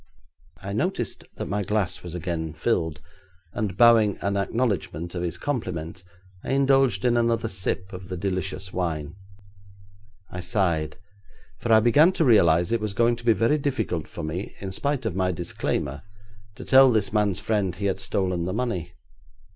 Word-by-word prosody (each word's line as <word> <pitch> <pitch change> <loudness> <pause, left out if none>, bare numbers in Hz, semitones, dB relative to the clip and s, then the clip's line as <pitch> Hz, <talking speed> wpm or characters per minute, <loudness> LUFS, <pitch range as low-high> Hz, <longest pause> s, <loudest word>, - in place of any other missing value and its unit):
I 100 +1 -4
noticed 120 - -2
that - - -4
my 100 +2 -1
glass 100 -2 -1
was 90 -1 -7
again 80 -2 -3
filled, 80 -3 -1 0.5
and 105 -5 -3
bowing 115 -3 +5
an 100 0 -1
acknowledgment 100 -6 -1
of 90 - -3
his 85 -1 -3
compliment, 90 - -4 0.4
I 130 - -2
indulged 135 -6 +3
in 120 -1 +3
another 115 -1 +1
sip 95 -1 -3
of 90 0 -9
the 90 - -4
delicious 95 0 -3
wine. 80 -4 -2 1.2
I 90 - -6
sighed, 85 -5 0 0.6
for 120 - -2
I 110 0 +7
began 145 +10 +5
to 165 - +1
realise 85 -7 +4
it 115 -2 +1
was 105 -2 -3
going 120 +2 +3
to 120 - -12
be 115 - +6
very 115 +9 +2
difficult 130 - -2
for - - -8
me, 85 +6 -5
in 95 -1 -5
spite 140 +5 -1
of 105 -6 -2
my 95 -1 +1
disclaimer, 80 -5 -3 0.5
to - - -9
tell 135 0 +7
this 110 -3 0
man's 105 -3 +2
friend 100 -5 -1
he 100 - -4
had 95 -1 0
stolen 90 -3 -1
the 90 - -2
money. 95 -8 -3
100 Hz, 170 wpm, -25 LUFS, 90-115 Hz, 1.2 s, I